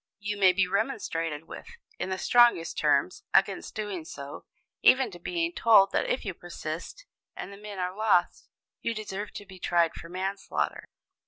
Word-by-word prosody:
You 205 0 -3
may 195 -2 +6
be 190 +1 +1
remonstrated 165 - -2
with, - - -9 0.3
in - - -2
the 190 - -2
strongest 240 -8 +4
terms, - - +1
against - - +2
doing 205 -6 -4
so, 140 -2 -9 0.4
even 255 -3 +5
to 175 - -11
being 340 - -2
told 205 -8 +5
that - - 0
if 250 - -1
you 195 - -3
persist, 170 - -7 0.3
and 200 - -7
the - - -11
men 205 -1 -8
are 180 0 -2
lost, 215 -4 +1 0.3
you 230 - -2
deserve 210 -1 -5
to 205 - -8
be 190 -1 -13
tried 170 -2 +2
for 170 - -10
manslaughter. 190 +2 -3
195 Hz, 170 wpm, -28 LUFS, 175-215 Hz, 0.4 s, may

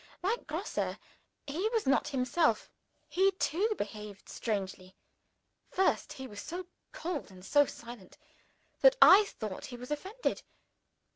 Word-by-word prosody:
Like 435 +6 -1
Grosse, 330 +7 -2 0.5
he 340 +10 -1
was 450 -2 0
not 270 +2 +3
himself 270 +5 +1 0.4
he 385 +2 +3
too 390 +5 0
behaved 210 -1 -6
strangely! 190 -3 -4 0.7
First, 380 -5 +1
he 265 -3 -7
was 205 -5 -8
so 355 +3 -5 0.3
cold 325 -6 -4
and 185 -1 -13
so 290 +5 +4
silent, 235 -5 -10 0.6
that - - +7
I 415 -1 +9
thought 215 - -6
he 245 - -8
was 250 +3 -9
offended. 385 +11 -2
290 Hz, 130 wpm, -31 LUFS, -, 0.7 s, I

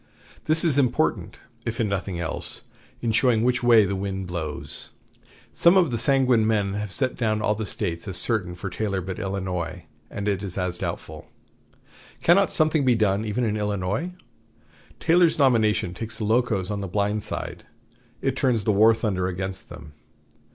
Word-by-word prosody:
This 155 +1 +1
is 145 -4 +3
important, 125 - 0 0.3
if 115 +2 -4
in 115 - +1
nothing 95 -2 -3
else, 80 -3 -5 0.4
in 115 - +1
showing 115 0 +3
which 125 0 +1
way 115 -3 +6
the 100 +1 -2
wind 95 0 -3
blows. 85 -4 -6 0.6
Some 170 +3 +5
of 175 -7 +3
the 120 - -1
sanguine 125 -3 +3
men 105 -3 +1
have 105 -1 -4
set 130 +4 -1
down 110 -3 0
all 105 0 +1
the 110 0 -4
States 85 -5 -4
as 95 -3 -2
certain 90 -5 +1
for 90 - -6
Taylor 100 -3 -2
but 95 +1 -5
Illinois, 90 -3 -4 0.2
and 100 0 -5
it 100 -2 0
as 95 -3 -5 0.2
doubtful. - - -6 1.0
Cannot 185 +3 +4
something 155 -2 +2
be 125 -2 +4
done 105 -1 +1
even 110 +4 -1
in 110 -2 0
Illinois? 105 - -2 0.9
Taylor's 170 0 +4
nomination 110 - +2
takes 110 +3 -4
the 110 - -4
Locos 110 -4 +1
on 100 -1 -3
the 100 - -4
blind 105 +3 0
side. - - -5 0.6
It 135 -1 0
turns 125 -5 +1
the 105 - +2
war 110 +3 +6
thunder 100 -5 -1
against 95 +1 -5
them. 85 -3 -11
105 Hz, 170 wpm, -24 LUFS, 95-120 Hz, 1.0 s, way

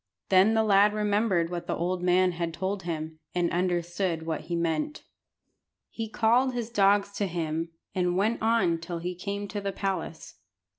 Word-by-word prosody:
Then 195 +4 +5
the 220 - +4
lad 205 0 +5
remembered 205 -5 +1
what 175 -1 -4
the - - -1
old 180 +1 -1
man 180 +1 +3
had 170 -1 -3
told 190 +2 -2
him, 160 -2 -5 0.2
and 175 -1 +1
understood 175 -1 -1
what 160 -1 -2
he 175 - -2
meant. 170 - -1 0.9
He 225 -1 -5
called 245 +4 +2
his 235 -1 -3
dogs 200 -1 +3
to 200 - 0
him, 165 -1 -2 0.2
and 180 -1 0
went 220 +4 +1
on 220 -7 +2
till 170 +1 -5
he 175 +2 -3
came 200 +3 -4
to 205 +1 -4
the 200 0 -2
palace. 190 -4 -4
185 Hz, 170 wpm, -27 LUFS, 170-205 Hz, 0.9 s, Then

